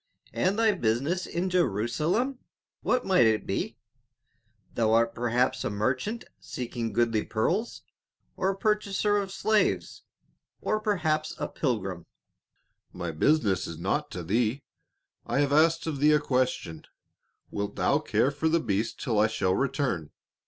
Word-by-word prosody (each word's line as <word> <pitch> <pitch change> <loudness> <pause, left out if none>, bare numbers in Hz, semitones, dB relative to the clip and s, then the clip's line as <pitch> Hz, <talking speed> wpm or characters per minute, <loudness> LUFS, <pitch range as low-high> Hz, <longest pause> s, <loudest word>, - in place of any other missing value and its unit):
"And 190 +3 +1
thy 225 -1 +4
business 145 - 0
in 175 +2 -2
Jerusalem, 175 - 0 0.4
what 250 0 +1
might 185 -12 +5
it 110 -1 +1
be? - - -3 1.0
Thou 110 -1 +2
art 115 0 +3
perhaps 120 +2 0
a - - -1
merchant 130 - -2
seeking 120 -2 -4
goodly 115 0 +1
pearls, 185 - -1 0.5
or 190 - 0
a 195 - -2
purchaser 210 0 +1
of 195 -1 -2
slaves, 215 +2 0 0.6
or 215 - 0
perhaps 160 -8 0
a - - -2
pilgrim?" 95 - -3 0.8
"My 85 -1 -4
business 100 - +2
is 85 - -7
naught 145 - -1
to 90 - -6
thee; 115 - 0 0.6
I 135 +4 +1
have 140 -1 +1
asked 165 +2 +4
of 155 -4 -3
thee 150 +2 +5
a 150 - +5
question, 125 - -1 0.7
wilt 100 0 -3
thou - - +2
care 135 - +1
for 150 +3 0
the 165 +1 +3
beast 105 -5 -2
till 115 -9 0
I 105 - +5
shall 95 -4 0
return? 125 - -1
135 Hz, 145 wpm, -27 LUFS, 110-180 Hz, 1.0 s, might